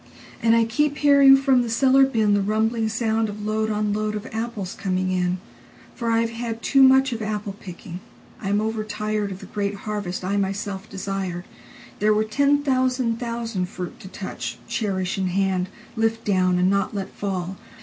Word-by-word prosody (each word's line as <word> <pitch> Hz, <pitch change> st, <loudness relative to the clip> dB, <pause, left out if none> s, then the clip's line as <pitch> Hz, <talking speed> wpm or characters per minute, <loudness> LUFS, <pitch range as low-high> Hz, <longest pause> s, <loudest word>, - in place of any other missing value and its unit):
And 230 Hz, 0 st, +4 dB
I 230 Hz, -, +4 dB
keep 290 Hz, +5 st, 0 dB
hearing 280 Hz, -2 st, +7 dB
from 270 Hz, -2 st, +3 dB
the 240 Hz, -, -2 dB
cellar 265 Hz, +3 st, +5 dB
binThe 210 Hz, -5 st, +2 dB
rumbling 220 Hz, +1 st, +1 dB
soundOf 220 Hz, -2 st, -1 dB
load 220 Hz, +1 st, 0 dB
on 210 Hz, -1 st, 0 dB
load 215 Hz, 0 st, -1 dB
of 210 Hz, +2 st, -5 dB
apples 225 Hz, -4 st, -3 dB
coming 185 Hz, -1 st, -1 dB
in. 180 Hz, 0 st, 0 dB, 0.6 s
For 235 Hz, -, -3 dB
I 230 Hz, 0 st, +3 dB
have 230 Hz, 0 st, -1 dB
had 230 Hz, 0 st, -5 dB
too 275 Hz, -, +4 dB
muchOf 265 Hz, -3 st, +5 dB
apple 210 Hz, -1 st, -3 dB
picking: 180 Hz, -1 st, -8 dB, 0.4 s
I 195 Hz, -, -3 dB
am 205 Hz, -, +2 dB
overtiredOf 215 Hz, -2 st, -2 dB
the -, -, -11 dB
great 200 Hz, -1 st, -2 dB
harvest 205 Hz, -4 st, -3 dB
I 200 Hz, +2 st, 0 dB
myself 195 Hz, 0 st, -3 dB
desired. 190 Hz, -2 st, -4 dB, 0.5 s
There 210 Hz, +1 st, +3 dB
were 215 Hz, -, +2 dB
ten 285 Hz, +6 st, +2 dB
thousand 255 Hz, -3 st, +1 dB
thousand 230 Hz, -6 st, -3 dB
fruit 180 Hz, -2 st, -7 dB
to -, -, -10 dB
touch, 120 Hz, -11 st, -6 dB
Cherish 195 Hz, -5 st, -1 dB
in 190 Hz, -, 0 dB
hand, 185 Hz, 0 st, 0 dB, 0.3 s
lift 225 Hz, 0 st, 0 dB
down, 185 Hz, -3 st, +2 dB
and 180 Hz, +1 st, +3 dB
not 200 Hz, +1 st, +1 dB
let 195 Hz, -1 st, -4 dB
fall. 190 Hz, -2 st, -4 dB
215 Hz, 170 wpm, -23 LUFS, 195-230 Hz, 0.6 s, hearing